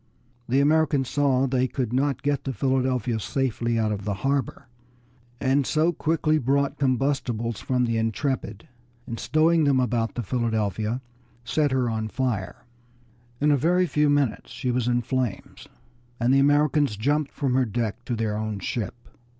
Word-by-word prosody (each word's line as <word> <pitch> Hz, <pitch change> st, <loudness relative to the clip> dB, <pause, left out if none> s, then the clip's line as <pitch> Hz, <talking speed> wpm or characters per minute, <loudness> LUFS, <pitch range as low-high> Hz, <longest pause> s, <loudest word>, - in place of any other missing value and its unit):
The 135 Hz, +3 st, +3 dB
Americans 145 Hz, -3 st, +2 dB
saw 140 Hz, -3 st, +2 dB
that 135 Hz, -1 st, 0 dB
they 130 Hz, 0 st, +2 dB
could 125 Hz, -3 st, -3 dB
not 135 Hz, 0 st, 0 dB
get 145 Hz, -1 st, 0 dB
the 135 Hz, -, -2 dB
Philadelphia 130 Hz, -1 st, 0 dB
safely 120 Hz, -1 st, -1 dB
out 110 Hz, -1 st, +1 dB
of 100 Hz, -1 st, -3 dB
the 105 Hz, -1 st, -2 dB
harbor, 135 Hz, -3 st, -1 dB, 0.7 s
and 140 Hz, +1 st, +2 dB
so 160 Hz, +3 st, +2 dB
quickly 155 Hz, 0 st, +1 dB
brought 140 Hz, +1 st, 0 dB
combustibles 125 Hz, -4 st, 0 dB
from 125 Hz, -1 st, +1 dB
the 115 Hz, -1 st, 0 dB
Intrepid, 110 Hz, -2 st, -2 dB, 0.4 s
and 115 Hz, -, -6 dB
stowing 160 Hz, +1 st, +3 dB
them 140 Hz, -2 st, +3 dB
about 120 Hz, -2 st, 0 dB
the 120 Hz, -, -2 dB
Philadelphia, 110 Hz, +1 st, -1 dB, 0.4 s
set 145 Hz, +5 st, +1 dB
her 130 Hz, -2 st, +1 dB
on 110 Hz, -1 st, -2 dB
fire. 110 Hz, -5 st, -3 dB, 0.7 s
In 150 Hz, +1 st, +3 dB
a 145 Hz, -, +4 dB
very 175 Hz, +6 st, +2 dB
few 150 Hz, -2 st, +2 dB
minutes 145 Hz, -5 st, 0 dB
she 125 Hz, -3 st, -3 dB
was 125 Hz, -1 st, 0 dB
in 120 Hz, 0 st, +1 dB
flames, 130 Hz, -3 st, -3 dB, 0.5 s
and 120 Hz, +3 st, +2 dB
the 135 Hz, -, +5 dB
Americans 145 Hz, -4 st, +3 dB
jumped 145 Hz, +6 st, 0 dB
from 135 Hz, -4 st, -1 dB
her 130 Hz, 0 st, +3 dB
deck 115 Hz, +1 st, -3 dB
to 120 Hz, -, -2 dB
their 110 Hz, -2 st, -1 dB
own 110 Hz, -1 st, -3 dB
ship. 100 Hz, +3 st, -3 dB
130 Hz, 165 wpm, -25 LUFS, 115-140 Hz, 0.7 s, the